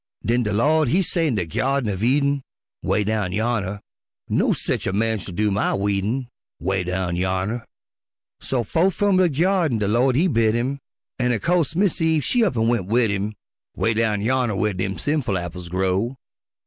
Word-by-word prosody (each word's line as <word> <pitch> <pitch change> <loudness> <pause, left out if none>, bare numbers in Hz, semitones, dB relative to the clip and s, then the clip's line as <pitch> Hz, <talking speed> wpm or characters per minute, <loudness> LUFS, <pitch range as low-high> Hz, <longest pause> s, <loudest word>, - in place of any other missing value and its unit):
Den 120 +2 +2
de 105 -3 -1
Lawd 150 +8 +3
He 180 +10 +2
say 165 -1 0
in 130 - 0
de 95 -4 -1
Gyardin 130 +5 0
uv 95 - -6
Eden, 140 +3 +2 0.4
('Way 105 - +1
down 105 -3 -1
yonner) 105 -2 -1 0.5
"No - - +2
sech - - -1
a 95 - -1
man 110 +1 +1
shell 90 -2 -7
do 105 +1 +1
my 100 - +1
weedin'," 100 +6 -1 0.3
('Way 95 +3 -1
down 90 -1 -2
yonner) 95 +6 -1 0.8
So 125 -3 -1
fo'th 170 - +1
f'um 205 -2 +2
de 185 -2 +4
Gyardin 165 - +1
de 105 -2 -1
Lawd 120 +4 +2
He 160 +7 +3
bid 115 -7 +2
him, 130 +4 -1 0.4
An' 125 -1 +2
o' - - +1
co'se 170 -1 +1
Mis' 185 -2 +1
Eve 160 -3 +2
she 245 -2 +3
up 195 - +1
an' 115 0 +2
went 115 -6 0
wid 115 0 +2
him, 105 +2 -2 0.4
'Way 115 - +1
down 110 -2 0
yonner 120 -1 +1
whar 105 +1 0
dem 95 0 -3
sinful 135 - 0
apples 85 0 -6
grow. 95 +7 0
115 Hz, 190 wpm, -22 LUFS, 100-140 Hz, 0.8 s, de